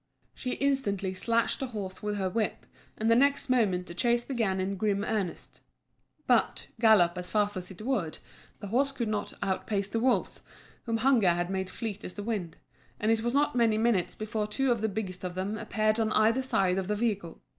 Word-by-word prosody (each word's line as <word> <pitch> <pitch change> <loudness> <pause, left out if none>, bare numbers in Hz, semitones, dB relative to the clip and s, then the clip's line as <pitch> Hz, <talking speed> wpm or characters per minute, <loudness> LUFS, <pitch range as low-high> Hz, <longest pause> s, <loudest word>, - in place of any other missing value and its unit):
She 250 - -3
instantly 205 -9 0
slashed 230 +5 0
the 265 - -2
horse 200 -6 -6
with 210 0 -2
her 190 -1 0
whip, 215 +3 -2 0.3
and 220 - -1
the 230 - +6
next 280 +1 +3
moment 195 -8 +2
the 170 - -9
chase 240 +4 +1
began 225 -8 0
in 190 +1 -1
grim 200 0 0
earnest. 210 -5 -3 0.6
But, - - +1
gallop 185 -6 +5
as 180 - -1
fast 205 -1 +1
as 180 -1 -4
it 190 +2 -10
would, 215 -11 -1 0.4
the 205 - -6
horse 275 +6 +2
could 235 -5 -3
not 210 -1 -2
outpace 200 +1 -1
the 225 - -1
wolves, 250 +2 +1 0.4
whom 230 -1 0
hunger 235 -5 +4
had 175 +1 0
made 190 -1 -2
fleet 215 -1 -5
as 180 - -6
the 205 - -5
wind, 200 -7 -3 0.4
and 215 +2 +2
it 225 -1 +2
was 240 +3 -1
not 290 -2 +2
many 230 -3 +3
minutes 220 -5 +1
before 215 0 -3
two 265 +4 +1
of 235 -3 0
the 220 - +1
biggest 190 -3 -5
of 180 -1 -4
them 190 +3 -2
appeared 215 0 0
on 220 -1 +1
either 225 +4 +3
side 190 -7 +1
of 190 - -3
the 210 - 0
vehicle. 205 -6 -2
215 Hz, 205 wpm, -29 LUFS, 190-235 Hz, 0.6 s, the